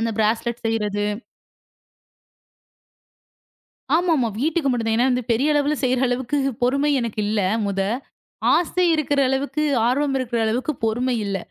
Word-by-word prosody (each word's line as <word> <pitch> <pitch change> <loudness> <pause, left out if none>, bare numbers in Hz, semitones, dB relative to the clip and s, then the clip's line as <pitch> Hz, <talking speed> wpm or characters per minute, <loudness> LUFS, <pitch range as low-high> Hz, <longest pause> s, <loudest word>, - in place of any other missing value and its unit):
அந்த 230 0 0
ப்ராஸ்லெட் 225 +2 0
செய்யறது. 210 -2 -1 2.9
ஆமாமா 325 -8 +2
வீட்டுக்கு 310 -1 +1
மட்டும் 230 -2 -1
தான். 220 - +2
ஏன்னா 250 +1 +2
பெரிய 280 +7 +2
அளவுல 295 +1 +1
செய்யற 255 -1 +2
அளவுக்குப் 260 +1 -1
பொறுமை 275 +4 +2
எனக்கு 230 -2 -4
இல்ல. 210 0 0 0.2
முத 195 -1 -1 0.7
ஆசை 360 +1 +1
இருக்கிற 290 -2 0
அளவுக்கு, 280 +3 -1 0.2
ஆர்வம் 275 +2 +1
இருக்கிற 240 -2 -2
அளவுக்குப் 250 +6 -2
பொறுமை 245 +3 0
இல்ல. 195 -1 -2
250 Hz, 125 wpm, -22 LUFS, 225-285 Hz, 2.9 s, ஆமாமா